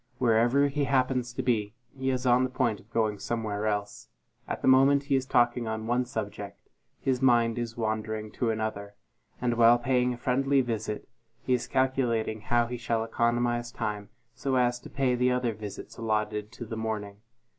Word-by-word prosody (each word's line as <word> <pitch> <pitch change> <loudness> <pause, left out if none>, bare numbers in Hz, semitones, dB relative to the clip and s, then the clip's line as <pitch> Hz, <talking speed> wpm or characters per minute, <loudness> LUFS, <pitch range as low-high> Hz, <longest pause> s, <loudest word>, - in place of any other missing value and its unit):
Wherever 120 +4 +3
he 140 0 -1
happens 130 -2 +1
to 125 - -4
be, 110 -3 0 0.2
he 130 0 -2
is 130 -1 -1
on 125 +1 +4
the 130 - 0
point 120 -5 0
of 105 - -20
going 110 -3 0
somewhere 110 -1 -2
else; 105 -1 -3 0.4
at - - -4
the - - +1
moment 135 +2 +5
he 140 -1 +1
is 130 -1 0
talking 120 -1 +2
on 110 0 -3
one 120 +2 +1
subject, 110 -4 -6 0.3
his 130 -1 0
mind 120 -3 +3
is 115 -1 -4
wandering 110 -1 -2
to 120 - -1
another; 110 -2 -3 0.4
and 120 -1 0
while 120 +1 +7
paying 125 0 +1
a 120 - -4
friendly 135 +3 +2
visit, 110 -3 -3 0.4
he 130 - +1
is 125 - 0
calculating 120 -5 0
how 120 +2 +2
he 120 +1 -5
shall 115 -1 -1
economize 120 +1 0
time 105 -3 -4 0.2
so 135 -1 -2
as 120 -1 +2
to - - -12
pay 135 -2 +1
the 125 +1 +2
other 125 -2 0
visits 105 -2 -8
allotted 105 -1 -1
to 120 - -7
the 115 - -6
morning. 110 -2 -4
120 Hz, 185 wpm, -28 LUFS, 110-125 Hz, 0.4 s, while